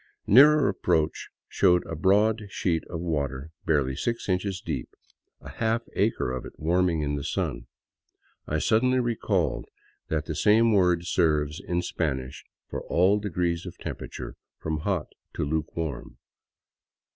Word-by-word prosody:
Nearer 150 +2 +7
approach 80 -5 0 0.2
showed 90 -2 +3
a 80 - -5
broad 105 +5 +2
sheet 85 -5 -1
of 85 -2 -5
water 70 -3 -2 0.2
barely 70 -4 +2
six 115 - -2
inches 95 0 -1
deep, 75 -10 -4 0.5
a - - -10
half 115 +1 -1
acre 60 - 0
of 65 -1 -4
it - - -9
warming 85 0 +1
in 70 0 -1
the 70 - -4
sun. - - -3 0.8
I 80 - 0
suddenly 125 +9 +2
recalled 105 - 0 0.4
that 80 -1 -1
the 80 - -3
same 110 +7 +4
word 90 -3 +3
serves 75 -4 +1
in 90 +1 -2
Spanish 65 -8 -3 0.2
for - - -5
all 95 +4 +3
degrees 90 -3 -2
of 90 - -9
temperature - - -7 0.2
from 80 -1 -3
hot 90 -1 -2 0.2
to - - -1
luke 80 +2 -3
warm. 80 -6 -4
85 Hz, 145 wpm, -26 LUFS, 75-100 Hz, 0.8 s, Nearer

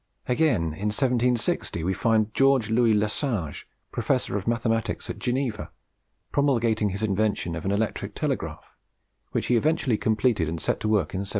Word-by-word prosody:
Again, 125 - +2
in 100 +6 -3
1760, 120 - 0
we 95 +3 0
find 110 +1 +1
George 135 -5 +3
Louis 115 -1 +4
Lesage, 105 - -1 0.2
professor - - 0
of 100 0 -3
mathematics 115 -1 -1
at - - -9
Geneva, 125 -4 -2 0.6
promulgating 115 -7 +2
his 100 +3 -3
invention 105 -4 0
of 80 - -6
an 95 - +1
electric 105 +2 -2
telegraph, - - -3 0.7
which - - -1
he 125 - +2
eventually 135 -3 +1
completed 110 -6 +1
and 80 0 -4
set - - -1
to - - -2
work 100 -8 +1
in 95 - -2
1774. 100 0 -4
110 Hz, 160 wpm, -25 LUFS, 100-125 Hz, 0.7 s, Louis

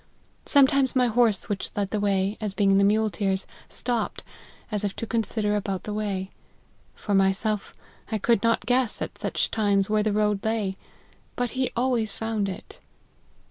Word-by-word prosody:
Sometimes 275 -2 +4
my 255 -1 +4
horse, 230 -3 +2
which 205 -4 -3
led 200 -1 -1
the 215 - 0
way, 200 0 +1
as 205 -3 -1
being 195 -1 +4
the - - +4
muleteer's, 205 -2 +1 0.2
stopped, 235 -3 -2 0.5
as 210 -1 -1
if 200 -1 -2
to - - -4
consider 220 -2 -1
about 195 -2 -2
the 210 - -4
way: 195 -3 -3 0.6
for 205 - -3
myself, 195 +2 +1 0.4
I 220 - +1
could 230 +1 +2
not 230 -3 +1
guess, 245 0 +1
at - - -8
such - - -1
times, 205 -2 +1
where 215 0 +3
the 215 0 +1
road 210 -1 +1
lay; 220 -4 -1 0.6
but 245 -2 -1
he 260 0 -1
always 240 -4 0
found 220 -3 -1
it. 185 - -9
210 Hz, 165 wpm, -25 LUFS, 200-230 Hz, 0.6 s, Sometimes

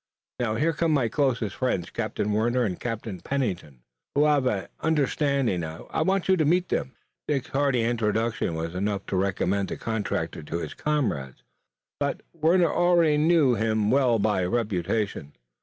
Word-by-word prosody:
Now, 110 -3 0
here 155 +8 +1
come 165 0 +1
my 130 -6 +2
closest 120 -6 0
friends, 125 -9 -1
Captain 105 - -2
Warner 120 +4 +1
and 95 -6 -2
Captain 110 -5 -4
Pennington, 90 - -3 0.3
who 145 - +4
have 145 -3 +3 0.3
understanding. 140 - +1
I 80 - -4
want 190 +3 +1
you 190 - +5
to 160 - +2
meet 175 +4 +2
them." 130 - -2 0.3
Dick's 140 -3 -1
hearty 135 -4 +1
introduction 110 -5 0
was 80 +1 -4
enough 100 +1 -2
to - - -3
recommend 95 +1 0
the - - -4
contractor 110 -2 -3
to 80 +2 -4
his - - -5
comrades, 115 - -2 0.6
but 140 -1 -1
Warner 170 +1 +3
already 170 -4 +4
knew 155 -4 +4
him 110 -1 +1
well 130 -3 +3
by 105 -3 +1
reputation. 100 -5 -1
120 Hz, 155 wpm, -26 LUFS, 100-145 Hz, 0.6 s, you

